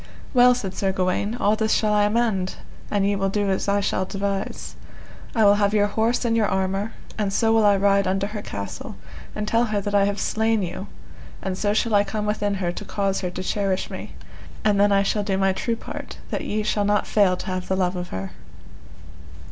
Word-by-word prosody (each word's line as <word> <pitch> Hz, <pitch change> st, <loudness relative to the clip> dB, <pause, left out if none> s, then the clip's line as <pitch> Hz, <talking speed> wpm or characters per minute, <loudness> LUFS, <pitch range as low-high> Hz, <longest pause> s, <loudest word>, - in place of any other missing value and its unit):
Well, 250 Hz, -1 st, +6 dB
said 195 Hz, -6 st, -4 dB
Sir 195 Hz, 0 st, 0 dB
Gawaine, 190 Hz, +4 st, 0 dB
all 210 Hz, -3 st, +2 dB
this 220 Hz, 0 st, +1 dB
shall 215 Hz, -1 st, +2 dB
I 210 Hz, 0 st, +4 dB
amend 210 Hz, -4 st, 0 dB, 0.3 s
an 205 Hz, -2 st, +1 dB
ye 200 Hz, +1 st, +2 dB
will 195 Hz, 0 st, 0 dB
do 200 Hz, 0 st, 0 dB
as 190 Hz, -, -1 dB
I 200 Hz, 0 st, +2 dB
shall 185 Hz, -, 0 dB
devise: 195 Hz, 0 st, -3 dB, 0.6 s
I 220 Hz, -2 st, +4 dB
will 200 Hz, -, +7 dB
have 205 Hz, +1 st, +2 dB
your 205 Hz, -1 st, +4 dB
horse 225 Hz, +4 st, 0 dB
and 230 Hz, -1 st, +2 dB
your 220 Hz, -2 st, +3 dB
armour, 195 Hz, +3 st, -1 dB, 0.3 s
and 205 Hz, -2 st, 0 dB
so 225 Hz, +3 st, +2 dB
will 225 Hz, -1 st, +4 dB
I 205 Hz, -1 st, +5 dB
ride 200 Hz, 0 st, +3 dB
unto 195 Hz, +1 st, 0 dB
her 210 Hz, 0 st, -5 dB
castle 100 Hz, -, -6 dB, 0.4 s
and 210 Hz, 0 st, -3 dB
tell 230 Hz, +2 st, +2 dB
her 215 Hz, -2 st, -1 dB
that 205 Hz, +1 st, -4 dB
I 200 Hz, -1 st, +4 dB
have 200 Hz, 0 st, -1 dB
slain 220 Hz, 0 st, +1 dB
you, 185 Hz, +3 st, -5 dB, 0.6 s
and 190 Hz, -1 st, -2 dB
so 205 Hz, +2 st, 0 dB
shall 225 Hz, 0 st, +1 dB
I 205 Hz, 0 st, +5 dB
come 210 Hz, +1 st, -3 dB
within 205 Hz, -1 st, 0 dB
her 180 Hz, -3 st, -1 dB
to -, -, -7 dB
cause 195 Hz, -1 st, -1 dB
her 180 Hz, -, -2 dB
to 185 Hz, +1 st, -6 dB
cherish 195 Hz, -1 st, -1 dB
me, -, -, -8 dB, 0.5 s
and 205 Hz, -2 st, +3 dB
then 200 Hz, -1 st, +4 dB
shall 210 Hz, +1 st, 0 dB
I -, -, -5 dB
do 195 Hz, -2 st, 0 dB
my 195 Hz, 0 st, +2 dB
true 230 Hz, +4 st, -1 dB
part -, -, -8 dB
that -, -, -2 dB
ye 215 Hz, +1 st, -1 dB
shall 210 Hz, 0 st, 0 dB
not 205 Hz, 0 st, +2 dB
fail 195 Hz, -4 st, +3 dB
to -, -, -7 dB
have 185 Hz, -2 st, -3 dB
the 190 Hz, -, 0 dB
love 185 Hz, -1 st, 0 dB
of 180 Hz, 0 st, -4 dB
her. 95 Hz, 0 st, -5 dB
200 Hz, 225 wpm, -23 LUFS, 195-215 Hz, 0.6 s, will